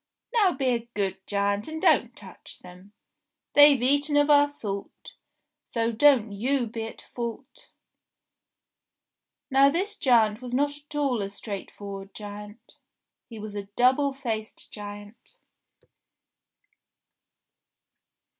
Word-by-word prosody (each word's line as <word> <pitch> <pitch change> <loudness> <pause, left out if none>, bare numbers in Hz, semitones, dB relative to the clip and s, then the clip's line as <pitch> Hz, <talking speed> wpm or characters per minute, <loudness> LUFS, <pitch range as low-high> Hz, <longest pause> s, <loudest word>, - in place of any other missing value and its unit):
Now 410 -7 +4
be 270 -2 -3
a 235 -1 -2
good 195 -2 -1
giant 200 0 -1
and 315 0 -5
don't 300 -9 +3
touch 190 -3 -12
them. 180 +3 -14 0.6
They've 290 -3 +7
eaten 285 +3 +2
of 290 +1 +4
our 290 0 +6
salt, 200 -8 -7 0.6
so 230 -1 0
don't 235 -2 +4
you 245 +6 0
be 225 0 -5
at 225 - -10
fault 240 +3 -7 0.9
!" - - -61
Now 270 +1 +6
this 405 +7 -2
giant 225 -4 +3
was 250 -1 -5
not 285 +2 +1
at 295 +1 -13
all 275 -6 0
a 195 - -3
straightforward 200 -1 -8
giant. 210 +2 -10 0.5
He 230 - -9
was 215 -1 -7
a 205 -1 -5
double 265 +3 +3
faced 230 -5 -6
giant. 205 +1 -10
235 Hz, 120 wpm, -26 LUFS, 205-285 Hz, 0.9 s, They've